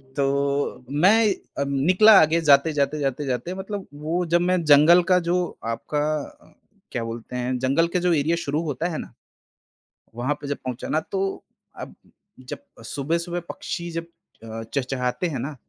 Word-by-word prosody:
तो 140 -1 -1
मैं 195 +10 +4 0.3
अ, - - +1
निकला 180 +11 +5
आगे 160 +2 +3
जाते-जाते, 145 0 +3
जाते-जाते 135 +2 -2
मतलब 195 +1 -6
वो 160 +5 -2
जब 170 +1 +2
मैं 180 0 +1
जंगल 155 +4 +7
का 180 - +6
जो 180 -1 -1
आपका 115 +6 -2 0.4
अ, - - -22 0.4
क्या 120 - -3
बोलते 115 +2 -7
हैं 125 +1 -1
जंगल 135 +6 +2
के 180 - +4
जो 180 0 +2
एरिया 160 +2 +1
शुरू 150 +3 -1
होता 160 +2 -2
है 160 - -4
ना, - - -8 1.0
वहाँ 125 +5 -1
पे 145 - -6
जब 145 - -2
पहुँचा 125 -1 -4
ना, 155 - +2
तो 195 +3 -3 0.4
अब - - -8 0.5
जब - - -4 0.3
सुबह-सुबह 170 +7 -2
पक्षी 170 0 -5
जब 165 0 -4 0.4
अ, 115 0 -7
चहचहाते 125 +4 -2
हैं 145 -6 -4
ना, 140 +4 -5
150 Hz, 160 wpm, -23 LUFS, 135-175 Hz, 1.0 s, जंगल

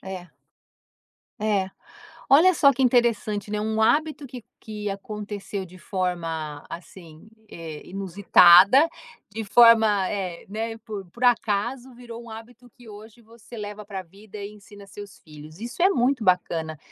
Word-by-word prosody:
É. 185 -3 -9 1.1
É. 200 -3 0 0.6
Olha 330 +7 +6
só 280 -2 +5
que 265 +1 -2
interessante, 225 -4 +1
né, 210 0 -2
um 220 +1 -1
hábito 300 +4 +1
que 250 -2 -10 0.2
que 210 -2 -6
aconteceu 200 -1 -6
de 185 +1 -16
forma, 165 -6 -4
assim, 170 0 -12 0.2
eh, 160 -3 -9
inusitada, 195 - +5 0.4
de 220 +2 -6
forma, 220 -3 +5
eh, 185 -4 -5
né, 225 +2 -5
por 210 -3 -8
por 240 +5 -6
acaso, 240 +2 0
virou 235 -1 -10
um 230 - -12
hábito 235 +2 -12
que 240 0 -18
hoje 215 +2 -13
você 230 +1 -15
leva 210 0 -7
pra 195 -2 -7
vida, 200 +4 -14
e 200 0 -7
ensina 205 0 -15
seus 200 0 -12
filhos. 155 +3 -14
Isso 240 +8 -5
é 385 - +5
muito 250 - 0
bacana. 165 -4 0
210 Hz, 145 wpm, -24 LUFS, 190-235 Hz, 1.1 s, Olha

